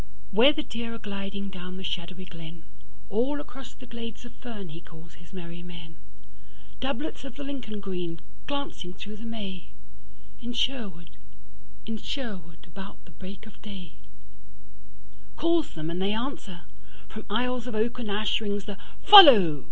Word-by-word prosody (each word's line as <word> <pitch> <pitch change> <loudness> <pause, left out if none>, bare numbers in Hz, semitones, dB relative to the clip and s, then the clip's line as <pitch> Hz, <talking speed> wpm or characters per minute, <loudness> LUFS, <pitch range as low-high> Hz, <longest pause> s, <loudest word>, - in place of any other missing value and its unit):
Where 235 +8 +7
the 305 0 -3
deer 230 -2 -5
are - - -5
gliding 200 -1 -5
down 180 0 -7
the 190 - -7
shadowy 185 +1 -4
glenAll 165 - -5
across 270 -3 -10
the 255 - -13
glades 235 -1 -7
of 240 - -11
fern 215 -7 -8
he 165 +2 -9
calls 165 -1 -15
his 170 +2 -17
merry 175 -2 -8
men; 170 -2 -10 0.8
Doublets 275 +1 -3
of 270 -3 -8
the 285 - -6
Lincoln 255 -7 -5
green 180 -4 -4 0.3
glancing 280 -11 -4
through 210 +4 -8
the 230 +2 -8
May, 195 -6 -6 0.7
In 240 0 -4
Sherwood, 205 - -2 0.7
in 225 0 -3
Sherwood, 190 - -6
about 195 +4 -10
the 175 - -16
break 185 +6 -10
of 215 - -15
day; 190 -6 -8 1.4
Calls 335 -2 +2
them 160 +1 -3
and 175 +2 -2
they 200 +2 +2
answer: 220 -7 -4 0.5
from 215 - -8
aisles 250 +3 0
of 240 - -4
oak 235 +3 0
and 230 -3 -3
ashRings 205 -1 0
the 200 -1 -6 0.2
Follow! 230 - +11
200 Hz, 150 wpm, -28 LUFS, 175-235 Hz, 1.4 s, Follow